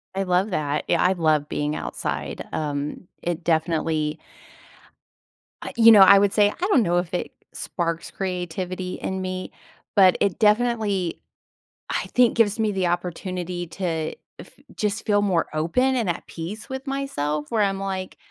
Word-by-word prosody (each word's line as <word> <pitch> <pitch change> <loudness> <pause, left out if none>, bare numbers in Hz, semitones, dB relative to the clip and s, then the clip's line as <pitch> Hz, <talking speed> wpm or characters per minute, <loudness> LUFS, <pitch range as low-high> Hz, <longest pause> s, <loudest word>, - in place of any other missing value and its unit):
I 195 - 0
love 185 +3 +1
that. 150 -3 -1
Yeah, - - +2
I 185 +1 +4
love 155 -4 +1
being 150 +1 -2
outside, - - -4
um, 145 +3 -3
it 175 0 -3
definitely 160 -2 0 1.4
uh, - - -5
you 230 -1 +8
know, 210 -3 +8
I 200 +1 +9
would 200 0 +2
say, 205 -1 +4
I 360 - -3
don't 270 - +4
know 175 -2 +1
if 175 +1 -2
it 180 - -2 0.2
sparks 170 -1 -3
creativity 180 0 -4
in 190 0 -4
me, 185 0 -4 0.4
but 190 -2 +6
it 200 -3 +1
definitely, 210 -5 +1 0.7
I - - -1
think, 245 -2 +4
gives 215 -1 +3
me 215 -1 +1
the 190 -3 0
opportunity 175 0 -3
to 165 -3 -3 0.2
f - - -11 0.3
just 210 +1 -2
feel 205 -1 +3
more 185 -5 +1
open 250 +13 +1
and 225 -7 0
at 170 - -3
peace 185 +7 -7
with 265 +1 -6
myself 150 - -2
where 220 -2 +2
I'm 195 -1 0
like, 190 -1 -4
185 Hz, 160 wpm, -23 LUFS, 165-205 Hz, 1.4 s, I